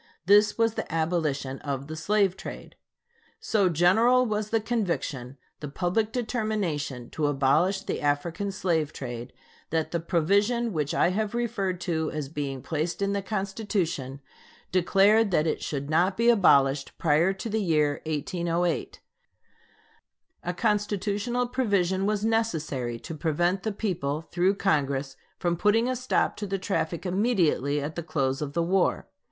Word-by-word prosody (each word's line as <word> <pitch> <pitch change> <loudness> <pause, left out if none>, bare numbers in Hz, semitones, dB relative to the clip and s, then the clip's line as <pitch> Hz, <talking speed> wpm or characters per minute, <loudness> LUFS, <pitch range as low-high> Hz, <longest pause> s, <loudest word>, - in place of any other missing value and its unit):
This 205 +3 +5
was 230 -1 +2
the - - -5
abolition 155 -5 -1
of 140 -2 -4
the 155 +2 -7
slave 195 +3 +1
trade. - - -9 0.6
So 200 -4 +2
general 220 +10 +4
was 215 -2 -2
the 225 - +2
conviction, 170 - -2 0.2
the 150 - -6
public 180 +9 -1
determination, 205 - -2
to 150 -2 0
abolish 150 +8 +2
the - - -4
African 165 +7 -1
slave 165 -5 0
trade, 120 -1 -6 0.4
that 160 -1 -1
the 170 - 0
provision 200 +8 +1
which 150 -3 -1
I - - +3
have 215 +3 -2
referred 210 -7 -1
to 160 -3 -1
as 150 -3 -4
being 140 -4 -4
placed 165 +4 -2
in 200 0 0
the 200 - -1
Constitution 190 - -3 0.5
declared 195 +4 +4
that 165 -4 +2
it 160 - -1
should 140 -2 -3
not 175 +5 +2
be 230 +1 +4
abolished 140 -11 +4
prior 165 +3 +3
to 195 +4 -6
the 220 0 -1
year 150 -5 +1
1808. 170 +2 -2 1.4
A 180 - -2
constitutional 210 +3 0
provision 200 -7 +1
was 210 0 0
necessary 155 - -1
to - - -7
prevent 175 +4 0
the 220 - -2
people, 170 -8 -2
through 180 +3 +2
Congress, 140 -7 0 0.2
from 175 -1 0
putting 215 +6 +2
a 255 - 0
stop 255 +1 0
to 205 - -4
the 195 0 -1
traffic 185 -3 -2
immediately 180 - +1
at 145 +2 -4
the 170 - -3
close 135 -4 -1
of 145 -1 -4
the 170 +1 +1
war. 185 +2 +1
175 Hz, 150 wpm, -27 LUFS, 150-210 Hz, 1.4 s, This